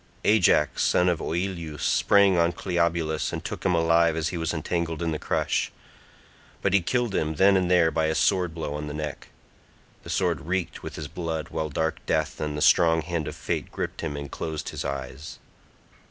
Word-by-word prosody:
Ajax 90 -8 +3
son 90 - +3
of 85 -3 +1
Oileus 85 -4 -3
sprang 100 -2 +4
on 85 0 +3
Cleobulus 85 -3 0
and - - -5
took - - -5
him 90 -2 +2
alive 85 0 +3
as 80 -1 -1
he - - -5
was 80 0 -1
entangled 80 0 -2
in 85 - 0
the 75 - -3
crush; - - 0 0.9
but 100 - +2
he 100 - +5
killed 120 +4 0
him 80 -3 0
then 95 +5 +5
and 90 -2 +2
there 85 -3 +4
by 80 -1 +1
a 80 - 0
sword 90 -4 +1
blow 80 -3 -4
on 75 0 -4
the 75 - -5
neck. 75 -3 -5 0.7
The - - -11
sword 85 -6 0
reeked 90 -4 -2
with - - -7
his 75 - -5
blood, 80 -1 -4
while 80 -1 -3
dark 80 +3 -2
death 80 0 -1
and 75 -1 -2
the 75 - 0
strong 80 -2 +5
hand 85 -2 -3
of - - -5
fate - - -3
gripped - - -4
him 75 -3 -3
and 70 -2 -6
closed 80 -2 -4
his - - -5
eyes. 70 +1 -6
80 Hz, 200 wpm, -26 LUFS, 75-90 Hz, 0.9 s, he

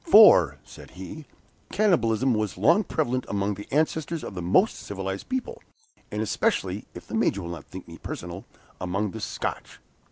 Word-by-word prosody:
"For," 90 - +8
said - - -13
he, 145 - -8 0.4
"cannibalism 130 - +3
was 110 -3 -1
long 170 +8 +5
prevalent 130 -8 -1
among 100 0 0
the 105 +1 -9
ancestors 160 +2 0
of - - -6
the 90 - -5
most 95 - +3
civilized 95 -1 -5
people, 260 - -3 0.5
and 105 +1 -2
especially 110 - 0
(if - - -9
the - - -11
Major 100 - +1
will 85 - -5
not 85 - -7
think 95 0 -10
me 85 0 -11
personal) 85 +2 -6 0.3
among 95 +3 -1
the 110 - -7
Scotch." - - -4
105 Hz, 165 wpm, -26 LUFS, 95-155 Hz, 0.5 s, For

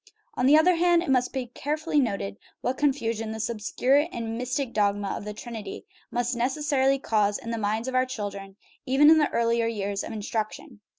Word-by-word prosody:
On 250 - +1
the 295 +3 +7
other 340 +2 +4
hand, 345 0 +4
it 335 - -1
must 250 -1 +2
be 260 -2 -3
carefully 295 +5 -1
noted 195 - -1 0.2
what 250 - -1
confusion 230 -7 0
this 220 +1 -2
obscure 255 +7 +1
and 225 -1 -4
mystic 255 +1 -2
dogma 205 -1 +1
of - - -4
the 210 - -5
Trinity 220 -3 -7 0.2
must 245 +1 -1
necessarily 270 +2 +1
cause 210 -5 +1
in 230 - -7
the 230 - -2
minds 220 +3 -1
of 260 - -3
our 255 0 +2
children 200 -5 -6 0.3
even 285 +4 +6
in 320 - +6
the 300 - +2
earlier 230 0 +1
years 200 -3 -2
of - - -6
instruction. 220 +3 -4
235 Hz, 190 wpm, -26 LUFS, 215-270 Hz, 0.3 s, the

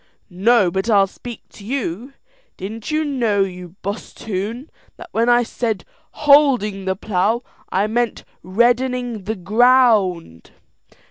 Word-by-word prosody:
"No, 200 +1 +3
but 190 +5 -2
I'll 200 -3 +5
speak 235 +4 -10
to 205 - -15
you. 240 0 -4 0.4
Didn't 215 +3 -7
you 310 0 0
know, 230 -8 +1
you 180 -2 -8
bosthoon, 210 - -5 0.3
that 355 - -11
when 230 +2 +1
I 240 0 +5
said 225 -2 -3 0.3
'holding 265 -10 +3
the 190 0 0
plough,' 215 +4 0 0.3
I 195 +2 +1
meant 235 +1 -1 0.2
reddening 240 +2 0
the 220 +2 -2
ground." 210 - +2
220 Hz, 125 wpm, -20 LUFS, 195-245 Hz, 0.4 s, I'll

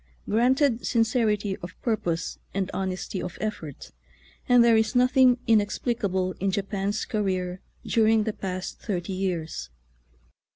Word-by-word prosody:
Granted 245 +2 +2
sincerity 220 -4 +1
of 185 -2 -10
purpose 180 -8 -1 0.2
and 195 -1 -1
honesty 190 0 -3
of 180 - -6
effort, 165 -10 -5 0.6
and 245 -1 +7
there 235 -1 +5
is 220 +2 +1
nothing 250 0 +5
inexplicable 205 -3 +1
in 195 - 0
Japan's 200 +1 -2
career 185 -4 -2 0.2
during 220 -1 +3
the 220 0 -2
past 185 -3 -5
thirty 190 -3 -3
years. 170 - -3
205 Hz, 120 wpm, -26 LUFS, 185-225 Hz, 0.6 s, and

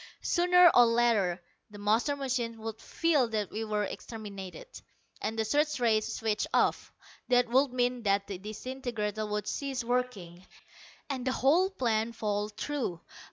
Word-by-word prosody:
Sooner 360 0 +5
or 245 -1 +7
later 230 -6 +2 0.3
the 205 - -12
master 220 +8 +1
machine 250 -4 -2
would 220 0 -7
feel 310 -7 +1
that 215 -3 -2
we 220 - -3
were 210 -1 -1
exterminated, 205 - -7 0.6
and 220 - -3
the 220 - 0
search 295 +5 +1
rays 220 -3 +2
switched 220 -2 -1
off. - - +1 0.4
That 245 -1 +3
would 265 +2 +3
mean 250 0 0
that 200 -2 +1
the 195 -3 -6
disintegrator 215 0 -4
would 210 -1 -2
cease 270 +1 -3
working, 230 -8 -3 0.6
and 265 -3 -3
the - - +2
whole 325 +10 +3
plan 235 - -1
fall 210 -1 -2
through. 220 -4 -3
230 Hz, 150 wpm, -30 LUFS, 210-255 Hz, 0.6 s, or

